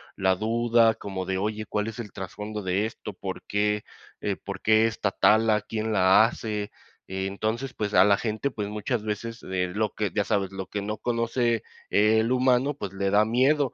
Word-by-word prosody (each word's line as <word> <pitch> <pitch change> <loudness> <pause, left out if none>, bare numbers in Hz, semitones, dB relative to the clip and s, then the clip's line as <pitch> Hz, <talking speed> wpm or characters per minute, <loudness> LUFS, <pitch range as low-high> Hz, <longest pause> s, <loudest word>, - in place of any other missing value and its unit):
la 95 -1 +2
duda 115 +2 +3
como 95 -2 -5
de, 95 +1 -1
oye, 105 +2 -2
¿cuál 105 0 -1
es 115 +1 -6
el 105 -4 -6
trasfondo 105 +2 -6
de 95 +3 0
esto?, 110 - -8
¿por - - -6
qué, 105 +1 0 0.4
eh, - - -1
por - - -8
qué 110 +1 +4
está 110 -3 -1
tala?, 110 +1 +4
¿quién 110 +1 -3
la 95 +2 +6
hace?, 105 -3 -3 0.4
eh, 95 0 -3
entonces, 110 +6 -3
pues, 105 -1 -3
a - - +7
la 100 0 +4
gente, 110 +5 -2
pues, 105 -4 -4
muchas 105 +2 -2
veces 110 +2 -4
le 90 -1 -1
lo 110 0 0
que, 105 -2 -2
ya 105 - +2
sabes, 100 -1 0
lo 95 -1 -5
que 100 - -4
no 105 +2 -3
conoce, 115 -1 0 0.3
eh, 105 +2 +4
el 115 +2 +1
humano, 130 +2 +3
pues, 100 -9 -6
le 95 0 -1
da 105 +1 +5
miedo, 130 +5 +2
105 Hz, 200 wpm, -26 LUFS, 100-115 Hz, 0.4 s, a